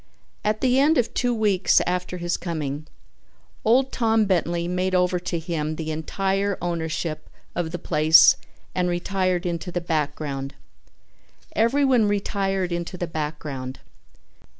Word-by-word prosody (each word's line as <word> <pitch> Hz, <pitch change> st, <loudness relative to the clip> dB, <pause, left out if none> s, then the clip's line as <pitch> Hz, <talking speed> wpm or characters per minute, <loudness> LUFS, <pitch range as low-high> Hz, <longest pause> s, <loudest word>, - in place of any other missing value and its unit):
At 215 Hz, 0 st, 0 dB
the 255 Hz, 0 st, +3 dB
end 300 Hz, +4 st, +4 dB
of 240 Hz, -, +1 dB
two 245 Hz, 0 st, +1 dB
weeks 210 Hz, -5 st, +3 dB
after 180 Hz, 0 st, -2 dB
his 175 Hz, 0 st, -1 dB
coming, 155 Hz, -3 st, -4 dB, 0.8 s
old 255 Hz, +4 st, +3 dB
Tom 225 Hz, -2 st, +2 dB
Bentley 170 Hz, -2 st, 0 dB
made 185 Hz, +1 st, 0 dB
over 180 Hz, 0 st, +2 dB
to 175 Hz, -1 st, -3 dB
him 160 Hz, -2 st, -3 dB
the 160 Hz, 0 st, -4 dB
entire 195 Hz, +5 st, -1 dB
ownership 165 Hz, -2 st, -3 dB, 0.2 s
of 175 Hz, -2 st, -2 dB
the 175 Hz, -, -3 dB
place 155 Hz, -1 st, +6 dB, 0.4 s
and 180 Hz, -1 st, 0 dB
retired 185 Hz, 0 st, 0 dB
into 175 Hz, +1 st, -3 dB
the 175 Hz, -, -1 dB
background. 150 Hz, -4 st, -3 dB, 1.0 s
Everyone 245 Hz, 0 st, +3 dB
retired 195 Hz, -2 st, -1 dB
into 170 Hz, +1 st, -3 dB
the 175 Hz, -, -2 dB
background. 150 Hz, -5 st, -5 dB
180 Hz, 130 wpm, -24 LUFS, 160-200 Hz, 1.0 s, place